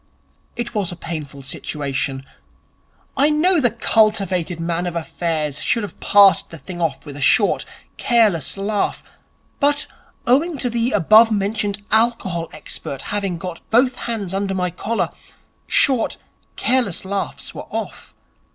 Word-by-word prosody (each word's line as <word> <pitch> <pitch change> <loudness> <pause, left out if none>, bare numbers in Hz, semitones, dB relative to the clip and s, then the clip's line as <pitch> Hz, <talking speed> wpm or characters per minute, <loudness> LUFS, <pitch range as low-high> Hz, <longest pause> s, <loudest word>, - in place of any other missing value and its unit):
It 240 0 -4
was 200 -5 -1
a - - -6
painful 150 -5 -7
situation. 135 -1 -3 0.9
I 285 +2 +5
know 330 +4 +3
the 245 - +4
cultivated 200 -6 +1
man 170 +1 -1
of 175 - -4
affairs 160 -3 -2
should 230 - +1
have 200 - -8
passed 200 -1 +5
the 165 - -9
thing 175 +2 -8
off 160 -4 -1
with 145 -2 -8
a 145 - -7
short, 200 +9 +3 0.3
careless 215 - +2
laugh; 205 +1 -1 0.6
but, 290 +1 +2 0.4
owing 290 +6 +2
to 245 -2 -1
the 235 +2 0
above 215 +4 +6
mentioned 205 0 -1
alcohol 210 -7 +1
expert 135 -1 -7
having 195 -4 -1
got 175 -1 -7
both 250 +3 +3
hands 205 -6 -3
under 195 0 -1
my 180 -1 -1
collar, 225 +6 -2 0.6
short, 260 -5 +3 0.4
careless 240 -9 0
laughs 200 +1 -4
were - - -8
off. - - -6
200 Hz, 140 wpm, -20 LUFS, 170-230 Hz, 0.9 s, above